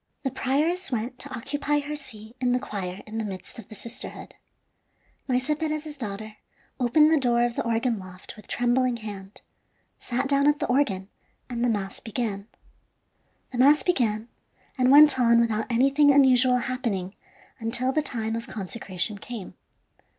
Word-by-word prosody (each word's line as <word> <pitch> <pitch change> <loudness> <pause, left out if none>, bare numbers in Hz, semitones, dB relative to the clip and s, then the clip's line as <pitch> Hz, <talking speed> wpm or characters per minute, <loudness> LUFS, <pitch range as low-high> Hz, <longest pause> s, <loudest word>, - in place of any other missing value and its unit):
The 270 - -1
prioress 300 +7 0
went 245 +2 -3
to - - -2
occupy 290 +4 -1
her 295 +1 -5
seat 235 -6 -10
in 250 -1 +1
the 250 - +2
choir 185 -5 -5
in 220 +1 -5
the - - -1
midst 190 +1 -7
of - - -11
the 215 - -10
sisterhood. 235 +4 -7 0.9
Maese 260 +3 +1
Perez's 305 0 -3
daughter 215 -3 -6 0.4
opened 300 +5 +4
the 315 - +4
door 240 -2 +2
of 240 -1 0
the - - -1
organ 230 -1 0
loft 185 +2 -10
with 210 -3 -15
trembling 245 0 +1
hand, 205 -3 -9 0.6
sat 255 +3 -2
down 280 +1 +3
at 295 0 +4
the - - -2
organ, 205 -8 0 0.4
and 235 0 -2
the 245 - +3
mass 200 -3 -2
began. 215 -3 -4 1.0
The 245 - -4
mass 290 +4 +6
began, 230 -10 +1 0.5
and 255 -1 +2
went 290 -1 +8
on 235 -1 +5
without 220 -2 +1
anything 275 +4 +4
unusual 255 -2 +5
happening 235 -7 -3 0.5
until 240 +3 -1
the 310 - +1
time 225 -6 -3
of 230 - -5
consecration 200 0 -2
came. 225 -2 -8
240 Hz, 160 wpm, -26 LUFS, 215-275 Hz, 1.0 s, went